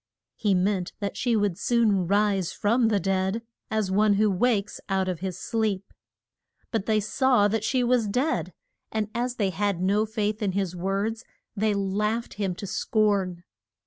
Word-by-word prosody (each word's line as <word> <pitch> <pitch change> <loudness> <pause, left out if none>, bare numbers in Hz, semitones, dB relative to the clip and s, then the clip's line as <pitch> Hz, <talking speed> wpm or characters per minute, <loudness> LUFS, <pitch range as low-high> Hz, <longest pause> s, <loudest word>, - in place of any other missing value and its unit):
He 205 -3 +1
meant 185 0 0
that 200 -2 -3
she 240 -2 +1
would 205 -5 0
soon 215 -7 +2
rise 200 -2 +2
from 230 +3 +2
the 210 -2 +2
dead, 190 +3 0 0.3
as 215 -3 0
one 205 +1 +4
who 210 0 +3
wakes 205 +1 0
out 190 -1 +1
of 180 -3 -2
his 185 -1 -4
sleep. 205 -1 -2 0.8
But 225 -4 -1
they 215 -1 +3
saw 230 +1 +3
that 215 +1 -1
she 255 +2 +1
was 240 -2 +2
dead, 255 +10 0 0.4
and 215 -1 -1
as 245 +2 -1
they 200 -5 0
had 200 0 -1
no 200 +4 +2
faith 215 -1 -2
in 200 -3 0
his 190 -2 -1
words 200 +6 -2 0.3
they 210 0 +1
laughed 210 +4 -1
him 195 -4 -2
to 200 - -6
scorn. 200 -3 0
205 Hz, 170 wpm, -26 LUFS, 195-220 Hz, 0.8 s, one